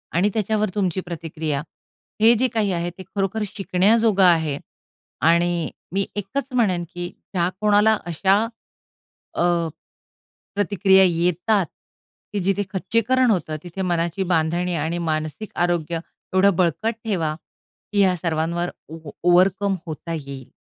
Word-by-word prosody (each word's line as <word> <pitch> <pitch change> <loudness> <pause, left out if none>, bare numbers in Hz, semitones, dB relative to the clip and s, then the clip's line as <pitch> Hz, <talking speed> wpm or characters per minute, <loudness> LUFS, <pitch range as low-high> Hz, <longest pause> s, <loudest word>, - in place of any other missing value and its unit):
आणि 185 +5 +3
त्याच्यावर 215 -1 0
तुमची 190 -3 0
प्रतिक्रिया. 160 -4 -3 0.6
हे 225 +2 +7
जे 255 +3 +2
काही 215 -3 +1
आहे 170 0 -1
ते 190 - -8
खरोखर 200 +2 0
शिकण्याजोगं 200 +2 +2
आहे 160 -5 +4 0.7
आणि 170 -1 +2 0.2
मी 195 0 +1
एकच 205 +7 -3
म्हणेन 195 -8 +2
की 175 0 -4 0.3
ज्या 175 -1 +1
कोणाला 210 +1 +4
अशा 190 +5 +2 0.9
अ, - - -1 1.1
प्रतिक्रिया 200 -1 +4
येतात, 180 +4 +1 0.7
की 205 - 0
जिथे 195 +2 +1
खच्चीकरण 230 +6 +2
होतं. 160 -6 -1
तिथे 180 +2 -6
मनाची 175 0 0
बांधणी 175 +2 +1
आणि 160 +2 -1
मानसिक 155 +6 -3
आरोग्य 170 -1 0 0.3
एवढं 190 0 +4
बळकट 185 +6 +1
ठेवा, 165 -8 -1 0.6
की 205 - +2
या 185 -2 +4
सर्वांवर 170 +1 -1 0.2
ओ 160 - -7
ओ - - -9 0.2
ओव्हरकम 190 +2 +4
होता 160 +2 -5
येईल. 140 -4 -7
180 Hz, 130 wpm, -22 LUFS, 170-205 Hz, 1.1 s, हे